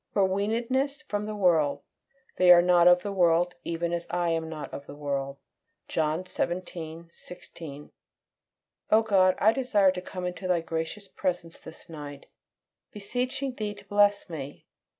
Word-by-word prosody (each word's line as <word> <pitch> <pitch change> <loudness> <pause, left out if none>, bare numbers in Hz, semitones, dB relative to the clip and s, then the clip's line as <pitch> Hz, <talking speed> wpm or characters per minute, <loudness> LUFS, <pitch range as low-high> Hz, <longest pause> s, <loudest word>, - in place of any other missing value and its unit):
FOR 200 - +3
WEANEDNESS 235 +9 -1
FROM 210 0 -2
THE 215 - -4
WORLD. 155 -8 +2 0.5
"They 180 -1 +4
are 175 -1 +8
not 175 -1 +5
of 180 0 +6
the 205 - -3
world, 175 -2 +3
even 170 0 -2
as 170 0 -3
I 175 0 0
am 165 -1 -1
not 155 -2 -7
of 140 - -8
the 145 - -9
world." 140 -1 -3 0.5
John 160 +3 -1
xvii. 170 -2 -4
16. 150 -5 -11 1.0
O 220 - +6
God, 190 -4 +4
I 215 - +5
desire 220 -7 +3
to 180 -1 -5
come 180 0 -6
into 180 +1 -4
Thy 180 -2 +2
gracious 165 +5 -4
presence 175 -3 -3
this 160 - -13
night, 145 -4 -9 0.7
beseeching 250 +5 -3
Thee 210 -3 -4
to 205 0 -15
bless 205 0 +3
me. 145 -5 -8
180 Hz, 155 wpm, -27 LUFS, 165-205 Hz, 1.0 s, are